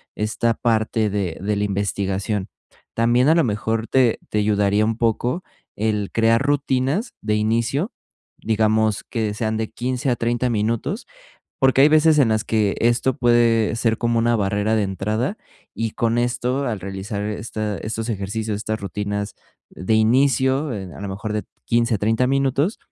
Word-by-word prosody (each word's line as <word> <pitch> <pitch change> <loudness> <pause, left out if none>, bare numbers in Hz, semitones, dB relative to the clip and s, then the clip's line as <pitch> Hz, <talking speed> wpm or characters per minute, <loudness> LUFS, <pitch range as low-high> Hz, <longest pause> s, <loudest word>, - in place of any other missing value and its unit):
esta 110 +2 0
parte 110 -2 +1
de 95 -5 -2
de 105 +2 -1
la 100 - -1
investigación. 100 0 -2 0.5
También 120 +4 +3
a 160 - +5
lo 165 - +4
mejor 110 0 -1
te 130 -3 +3
te 105 - 0
ayudaría 105 0 +2
un 115 0 -1
poco 120 - 0 0.3
el 105 -2 -1
crear 115 0 +3
rutinas 140 - 0
de 105 0 0
inicio, 115 - 0 0.5
digamos 110 -1 +1
que 110 -3 -2
sean 110 0 -1
de 110 -1 -2
15, 125 +2 -2
a 120 - +2
30, 120 +1 0
minutos 115 - -1 0.5
porque 135 0 +4
hay 145 - +8
veces 155 0 +5
en 130 -5 +4
las 110 -1 +1
que 105 -3 +1
esto 120 +2 +1
puede 120 -2 +3
ser 115 -1 +1
como 120 -1 +1
una 120 +1 +2
barrera 105 +1 0
de 110 - +2
entrada 105 - -2 0.4
y 115 0 -2
con 115 +1 0
esto, 125 +3 -1
al 110 -4 -2
realizar 100 +2 -5
esta 105 0 -3
estos 110 +2 -4
ejercicios, 105 +1 -3
estas 110 +1 -3
rutinas 100 +1 -3 0.4
de 95 +6 -1
inicio, 130 +4 +2
eh, 95 -4 -5
a - - -9
lo 100 - -4
mejor 105 +2 -4
de 105 - -2 0.2
15, 115 0 +2
a - - -1
30, 115 +5 +1
minutos, 135 - +1
110 Hz, 165 wpm, -21 LUFS, 105-120 Hz, 0.5 s, hay